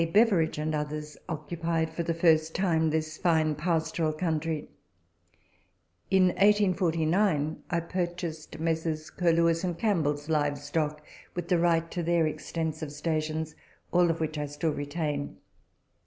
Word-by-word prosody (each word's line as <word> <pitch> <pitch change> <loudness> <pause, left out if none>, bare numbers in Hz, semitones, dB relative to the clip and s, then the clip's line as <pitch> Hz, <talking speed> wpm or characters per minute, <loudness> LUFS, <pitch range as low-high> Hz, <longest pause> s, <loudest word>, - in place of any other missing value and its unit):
Beveridge, 200 -8 +4
and 155 +1 -1
others, 150 0 -3
occupied 165 0 -2
for 170 - -2
the 165 0 -1
first 160 -1 +3
time 165 -4 +2
this 155 0 -2
fine 160 -3 +2
pastoral 160 0 0
country. 160 -1 -2 1.4
In 190 -1 +5
1849 180 -4 +2
I 170 - +1
purchased 175 -2 -4
Messrs. 160 -1 -1
Curlewis 170 -1 +2
and 175 -2 -1
Campbell's 150 -9 0
live 145 -2 +1
stock, 150 +1 -2 0.3
with 175 -1 -4
the 180 - +3
right 165 -1 +2
to 175 - -2
their 170 -1 +2
extensive 155 0 -3
stations, 155 +1 -2 0.4
all 175 0 +4
which 160 -2 -1
I 150 - -2
still 150 +2 -1
retain. 145 0 -3
160 Hz, 125 wpm, -28 LUFS, 155-170 Hz, 1.4 s, In